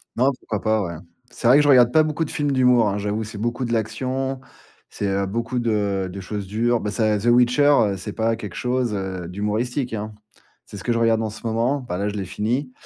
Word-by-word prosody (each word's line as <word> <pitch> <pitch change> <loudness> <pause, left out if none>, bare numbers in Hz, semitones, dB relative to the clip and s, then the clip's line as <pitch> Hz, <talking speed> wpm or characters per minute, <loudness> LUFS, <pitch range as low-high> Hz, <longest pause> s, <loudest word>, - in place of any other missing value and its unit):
Non, 130 +4 +3
pourquoi 105 -4 -4
pas. 110 -1 +1
Ouais. 85 -2 -5 0.3
C'est 120 - -3
vrai 130 +4 +7
que 150 - +5
je - - +1
regarde 125 -4 +6
pas 155 +2 +5
beaucoup 155 +1 -1
de - - -8
films 145 -1 -1
d'humour, 125 -4 +4
hein, 100 - -2
j'avoue. 105 +2 -2
C'est 110 -1 -8
beaucoup 120 +3 -2
de 120 - -2
l'action, 130 +4 -2 0.5
c'est, 100 - -3
heu, 100 0 0
beaucoup 115 +5 -2
de, 120 -1 -1 0.4
heu, - - -6
de 95 +2 -7
choses 100 +1 -5
dures, 115 +4 +1
bah, 105 - -3
ça 110 -1 +1
The 105 - -6
Witcher 125 -2 +4
c'est 105 +2 -6
pas 115 0 0
quelque 105 -5 -8
chose, 125 -2 -1
heu, 95 -3 -4
d'humoristique, 110 +7 -2
hein. 110 0 -4 0.5
C'est - - -10
ce 95 - -9
que 120 - 0
je 115 - 0
regarde 115 -1 +3
en 110 - -2
ce 110 +2 -10
moment, 115 +5 0
bah, 90 - -3
là, 100 +2 -1
je 105 - -6
l'ai 100 -2 -3
fini. 120 +8 -2
115 Hz, 245 wpm, -22 LUFS, 105-125 Hz, 0.5 s, vrai